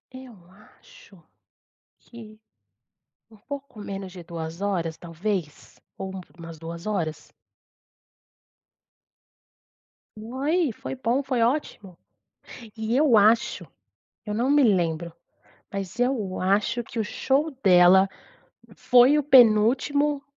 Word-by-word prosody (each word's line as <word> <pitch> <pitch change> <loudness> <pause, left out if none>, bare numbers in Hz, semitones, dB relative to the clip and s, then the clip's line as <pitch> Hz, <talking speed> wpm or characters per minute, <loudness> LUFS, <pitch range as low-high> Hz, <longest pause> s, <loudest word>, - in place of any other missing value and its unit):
Eu 260 -5 -12 0.4
acho - - -19 0.7
que, 220 -2 -14 0.9
por 220 -2 -21
pouco 280 -5 -8
menos 195 -2 -7
de 180 - -10
2 165 0 -7
horas, 175 -5 -2
talvez? 175 -1 -5 0.2
Ou 190 0 -6
um 190 - -6 0.2
umas 165 -1 -10
2 170 +3 -8
horas? 170 -7 -4 2.9
Foi. 275 +8 -1
Foi 245 - -7
bom. 260 +2 -1
Foi 255 -3 -1
ótimo! 230 - -2 0.8
E 220 +2 -2
eu 270 -5 +4
acho 220 +3 +2 0.6
eu 210 - -3
não 240 +5 0
me 290 0 +4
lembro, 170 -6 +1 0.6
mas 195 +3 -6
eu 240 -7 -1
acho 205 +5 0
que 230 - -8
o 220 - 0
show 275 +8 0
dela 185 0 +6 0.7
foi 250 +3 +5
o - - +1
penúltimo 270 +3 +4
215 Hz, 110 wpm, -24 LUFS, 185-260 Hz, 2.9 s, dela